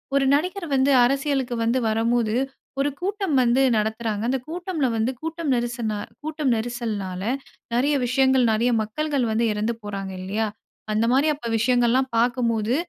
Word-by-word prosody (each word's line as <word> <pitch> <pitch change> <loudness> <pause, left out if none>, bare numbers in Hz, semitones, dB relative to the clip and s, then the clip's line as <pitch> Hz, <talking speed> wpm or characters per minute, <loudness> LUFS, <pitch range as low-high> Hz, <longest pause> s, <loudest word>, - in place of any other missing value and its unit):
ஒரு 275 -1 +3
நடிகர் 360 +5 0
வந்து 265 +1 +3
அரசியலுக்கு 270 -1 0
வந்து 235 +3 +2
வரும்போது 225 0 +1 0.5
ஒரு 280 +1 +2
கூட்டம் 390 -4 -1
வந்து 245 +2 +3 0.2
நடத்துறாங்க. 220 0 -1
அந்த 265 - +1
கூட்டம்ல 345 -3 -2
வந்து 225 +3 +1
கூட்டம் 325 -1 -3
நெரிச 240 +1 -2 0.5
கூட்டம் 305 -3 -1
நெரிசல்னால 220 -5 -3 0.5
நிறைய 275 +5 +2
விஷயங்கள் 260 0 +3
நிறைய 225 +3 +2
மக்கள்கள் 280 +4 -1
வந்து 225 +2 +1
இறந்து 215 +3 -1
போறாங்க 195 -2 -5
இல்லையா, 210 +4 -1 0.4
அந்த 215 +2 +2
மாதிரி 275 +4 +3 0.3
விஷயங்கள்லாம் 245 +2 +2
பார்க்கும்போது 235 -1 +1
245 Hz, 135 wpm, -23 LUFS, 220-280 Hz, 0.5 s, ஒரு